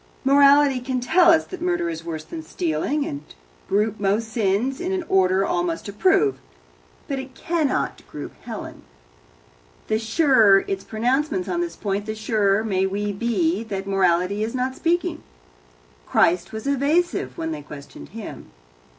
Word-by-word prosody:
Morality 280 0 +5
can 255 0 -2
tell 335 +8 +4
us 320 -1 +5
that 370 - -9
murder 350 - 0
is 165 -1 -5
worse 160 -2 -5
than 160 +1 -7
stealing, 165 - -2
and 140 0 -5 0.5
group 210 +1 +1
most 205 +3 0
sins 220 - 0
in 365 +1 -2
an 375 -2 -1
order 190 0 +3
all 175 - 0
must 170 +1 -3
approve, 385 - +2 0.7
but 275 -4 -2
it 265 0 -9
cannot 325 -5 -1
group 145 - -7
Helen. - - -8 1.1
The 215 - +1
surer 225 -4 +4
its 195 0 -3
pronouncements 265 +10 -1
on 345 - -1
this 345 -1 -3
point, 205 0 -3
the 215 - -3
surer 215 -2 +1
may 190 -3 0
we 205 +1 -2
be 200 -3 0
that 195 -3 -4
morality 195 +1 +1
is 230 +3 -3
not 260 +1 -1
speaking. 345 +1 -1 0.9
Christ 170 +1 +2
was 220 0 -6
evasive 285 +8 0
when 325 -1 -3
they 315 - -5
questioned 140 - -11
Him. - - -9
220 Hz, 155 wpm, -23 LUFS, 195-285 Hz, 1.1 s, Morality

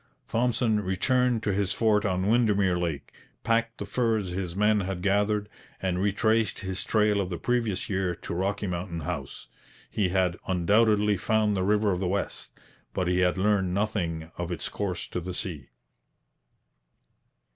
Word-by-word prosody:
Thompson 115 -2 +1
returned 115 +5 +1
to 105 - 0
his 100 0 0
fort 105 -1 +2
on 95 -1 0
Windermere 105 -5 +3
Lake, 80 -6 -3 0.3
packed 115 0 +1
the - - -5
furs 110 -6 0
his 90 -1 -4
men 105 +1 +3
had 95 -2 -3
gathered, 105 +1 +1 0.3
and 90 -1 -1
retraced 110 +2 +1
his 95 -1 -2
trail 105 -2 +2
of 90 - -3
the 85 - -3
previous 115 -5 -1
year 95 -3 -1
to - - -7
Rocky 100 +4 -1
Mountain 85 -2 -3
House. - - -5 0.5
He 100 -4 +1
had 90 -1 +1
undoubtedly 105 +3 +3
found 105 +1 +1
the 95 - 0
River 105 +2 +2
of 90 - -1
the 95 - -1
West, 100 +3 -3 0.4
but 90 -2 0
he 90 0 +2
had 90 -1 +2
learned 95 -2 +1
nothing 85 -6 -2
of 90 0 -3
its 85 - -3
course 100 -3 -3
to - - -3
the 90 +1 -6
sea. 75 -11 -6
100 Hz, 160 wpm, -27 LUFS, 90-105 Hz, 0.5 s, Windermere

